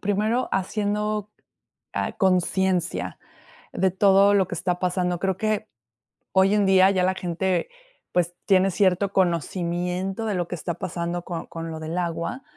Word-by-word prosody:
primero 215 Hz, +5 st, 0 dB
haciendo, 210 Hz, +2 st, -1 dB, 0.6 s
ah, -, -, -2 dB
conciencia 185 Hz, -1 st, 0 dB, 0.6 s
de 190 Hz, -, +2 dB
todo 195 Hz, +1 st, +5 dB
lo 195 Hz, -3 st, +3 dB
que -, -, -5 dB
está 180 Hz, -1 st, -1 dB
pasando. 180 Hz, -1 st, 0 dB
Creo 190 Hz, -1 st, -1 dB
que, 215 Hz, 0 st, -1 dB, 0.7 s
hoy 190 Hz, +1 st, +4 dB
en 205 Hz, -1 st, +3 dB
día 190 Hz, 0 st, +6 dB
ya 185 Hz, -2 st, +1 dB
la 185 Hz, +1 st, +1 dB
gente, 180 Hz, 0 st, -1 dB, 0.4 s
pues, 175 Hz, 0 st, 0 dB
tiene 190 Hz, 0 st, +4 dB
cierto 190 Hz, 0 st, +2 dB
conocimiento 180 Hz, +2 st, -1 dB
de 210 Hz, -3 st, -1 dB
lo 175 Hz, -2 st, -1 dB
que 180 Hz, -, -4 dB
está 170 Hz, 0 st, -4 dB
pasando 175 Hz, 0 st, -4 dB
con 170 Hz, -2 st, -5 dB
con 165 Hz, 0 st, -6 dB
lo 160 Hz, -, -6 dB
del 160 Hz, +2 st, -4 dB
agua, 175 Hz, +8 st, -3 dB
185 Hz, 155 wpm, -24 LUFS, 175-195 Hz, 0.7 s, día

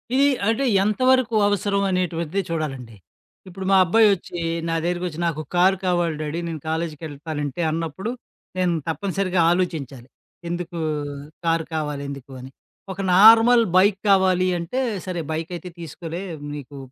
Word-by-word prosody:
ఇది 275 Hz, +1 st, +5 dB, 0.2 s
అంటే 225 Hz, +4 st, +1 dB, 0.2 s
ఎంతవరకు 255 Hz, +2 st, +2 dB
అవసరం 200 Hz, 0 st, 0 dB
అనేటువంటిది 180 Hz, 0 st, -1 dB
చూడాలండి. 135 Hz, -8 st, -4 dB, 0.5 s
ఇప్పుడు 190 Hz, +1 st, -7 dB
మా -, -, +6 dB
అబ్బాయొచ్చి 195 Hz, -2 st, +2 dB, 0.3 s
నా -, -, 0 dB
దగ్గరకొచ్చి 175 Hz, -1 st, -2 dB
"నాకు 155 Hz, -2 st, -2 dB
కారు 185 Hz, +2 st, +4 dB
కావాలి 175 Hz, -3 st, +1 dB
డ్యాడీ, 155 Hz, +2 st, -3 dB
నేను 165 Hz, -2 st, -5 dB
కాలేజికెళ్తానంటే" 155 Hz, -2 st, -4 dB
అన్నప్పుడు 165 Hz, +6 st, -3 dB, 0.5 s
నేను 180 Hz, -1 st, +1 dB
తప్పనిసరిగా 185 Hz, +1 st, -1 dB
ఆలోచించాలి. 150 Hz, -9 st, -2 dB, 0.4 s
ఎందుకు 175 Hz, 0 st, -4 dB, 0.7 s
కారు 165 Hz, -1 st, +1 dB
కావాలెందుకు 140 Hz, -3 st, -5 dB
అని. 130 Hz, +1 st, -10 dB, 0.4 s
ఒక 190 Hz, -, -8 dB, 0.2 s
నార్మల్ 225 Hz, +4 st, +8 dB
బైక్ 195 Hz, +1 st, +4 dB
కావాలి 185 Hz, -2 st, +4 dB
అంటే 170 Hz, +10 st, -3 dB, 0.3 s
సరే 180 Hz, -2 st, -3 dB
బైక్ 160 Hz, +1 st, -3 dB
అయితే 180 Hz, +1 st, -7 dB
తీసుకోలే. 165 Hz, +1 st, -6 dB, 0.3 s
నీకు 145 Hz, -1 st, -9 dB
175 Hz, 125 wpm, -22 LUFS, 155-195 Hz, 0.7 s, నార్మల్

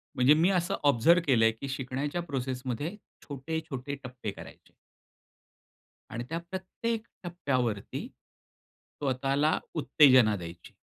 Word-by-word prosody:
म्हणजे 125 Hz, +4 st, +6 dB
मी 165 Hz, +5 st, +3 dB
असं 185 Hz, +1 st, +1 dB
ऑब्झर्व 145 Hz, +6 st, +5 dB
केलंय, 115 Hz, -4 st, +5 dB
की 115 Hz, +5 st, -8 dB
शिकण्याच्या 135 Hz, +5 st, -3 dB
प्रोसेस 130 Hz, -5 st, -3 dB
मध्ये 145 Hz, -, -3 dB, 0.3 s
छोटे-छोटे 145 Hz, -1 st, -5 dB
टप्पे 125 Hz, -4 st, -6 dB
करायचे. -, -, -13 dB, 1.4 s
आणि 120 Hz, -, -5 dB
त्या 165 Hz, -, -2 dB
प्रत्येक 220 Hz, +5 st, -3 dB, 0.2 s
टप्प्यावरती, 130 Hz, -, -2 dB, 0.9 s
स्वतःला 140 Hz, +2 st, +1 dB, 0.2 s
उत्तेजना 130 Hz, -8 st, +5 dB
द्यायची. 85 Hz, -1 st, -9 dB
140 Hz, 105 wpm, -29 LUFS, 125-160 Hz, 1.4 s, म्हणजे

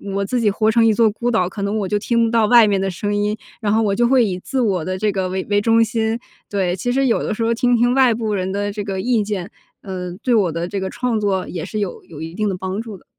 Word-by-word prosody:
我 200 Hz, 0 st, 0 dB
自 245 Hz, +4 st, -1 dB
己 215 Hz, -, +3 dB
活 215 Hz, +2 st, +1 dB
成 230 Hz, +1 st, +4 dB
一 225 Hz, -, +5 dB
座 225 Hz, +1 st, +4 dB
孤 235 Hz, +3 st, -2 dB
岛， 185 Hz, -7 st, +1 dB
可 200 Hz, +2 st, -7 dB
能 200 Hz, +2 st, -1 dB
我 205 Hz, -3 st, -1 dB
就 210 Hz, +2 st, 0 dB
听 235 Hz, +2 st, +1 dB
不 225 Hz, -, -1 dB
到 225 Hz, -2 st, +3 dB
外 235 Hz, 0 st, +7 dB
面 200 Hz, -2 st, +1 dB
的 195 Hz, -, 0 dB
声 205 Hz, +3 st, -3 dB
音， 205 Hz, +1 st, 0 dB, 0.2 s
然 210 Hz, -2 st, 0 dB
后 220 Hz, +1 st, +3 dB
我 205 Hz, -2 st, +1 dB
就 240 Hz, +4 st, +2 dB
会 255 Hz, -1 st, +4 dB
以 185 Hz, -3 st, -3 dB
自 265 Hz, +8 st, -3 dB
我 195 Hz, -8 st, +1 dB
的 185 Hz, +3 st, -3 dB
这 210 Hz, +2 st, 0 dB
个 190 Hz, -1 st, -2 dB
为 190 Hz, 0 st, -3 dB
为 205 Hz, 0 st, +3 dB
中 230 Hz, +1 st, +4 dB
心， 225 Hz, 0 st, -1 dB, 0.3 s
对。 190 Hz, -3 st, 0 dB
其 220 Hz, +7 st, -2 dB
实 270 Hz, +2 st, +2 dB
有 235 Hz, -, +2 dB
的 -, -, -2 dB
时 230 Hz, -, -2 dB
候 230 Hz, +1 st, +2 dB
听 245 Hz, +1 st, +2 dB
听 240 Hz, +1 st, +3 dB
外 260 Hz, -2 st, +5 dB
部 220 Hz, -2 st, -2 dB
人 190 Hz, -1 st, -2 dB
的 205 Hz, +1 st, -2 dB
这 205 Hz, 0 st, -4 dB
个 195 Hz, -2 st, -4 dB
意 230 Hz, +2 st, +1 dB
见， 200 Hz, -4 st, -4 dB, 0.3 s
呃， 185 Hz, -2 st, -5 dB
对 250 Hz, -, +2 dB
我 200 Hz, -7 st, +3 dB
的 170 Hz, +2 st, -3 dB
这 200 Hz, +2 st, -3 dB
个 190 Hz, 0 st, -3 dB
创 245 Hz, -1 st, -1 dB
作 190 Hz, -3 st, 0 dB
也 170 Hz, -3 st, -5 dB
是 215 Hz, -, -5 dB
有 200 Hz, -4 st, -3 dB
有 155 Hz, -, -11 dB
一 160 Hz, +1 st, -6 dB
定 210 Hz, +2 st, -1 dB
的 190 Hz, -, -3 dB
帮 190 Hz, +3 st, -3 dB
助 220 Hz, -4 st, -8 dB
的。 -, -, -24 dB
210 Hz, 325 characters per minute, -20 LUFS, 190-230 Hz, 0.3 s, 外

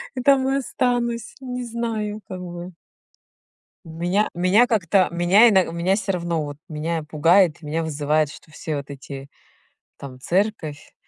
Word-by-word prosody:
и 255 Hz, -, -2 dB
там 275 Hz, -2 st, +4 dB
и 270 Hz, -, +1 dB
останусь. 240 Hz, -2 st, -1 dB
Не 250 Hz, -1 st, -5 dB
знаю 220 Hz, -3 st, -3 dB
как 185 Hz, -1 st, -7 dB
бы. 175 Hz, 0 st, -7 dB, 1.1 s
Меня 175 Hz, +6 st, 0 dB
меня 185 Hz, +7 st, +4 dB
как-то 195 Hz, -5 st, +2 dB
меня 180 Hz, +7 st, +5 dB
ино 190 Hz, -4 st, +3 dB
у 165 Hz, -, -7 dB
меня 180 Hz, +3 st, +1 dB
всё 200 Hz, -2 st, -2 dB
равно 170 Hz, -3 st, -1 dB
вот 145 Hz, 0 st, -7 dB
меня 160 Hz, +1 st, -2 dB
пугает, 165 Hz, +2 st, +3 dB
меня 160 Hz, +2 st, -2 dB
вызывает, 150 Hz, -1 st, 0 dB
что -, -, -14 dB
все 155 Hz, 0 st, -4 dB
вот 140 Hz, 0 st, -7 dB
эти 135 Hz, 0 st, -9 dB, 0.7 s
там 130 Hz, -2 st, -10 dB
церковь, 175 Hz, -, -2 dB
175 Hz, 150 wpm, -22 LUFS, 155-220 Hz, 1.1 s, меня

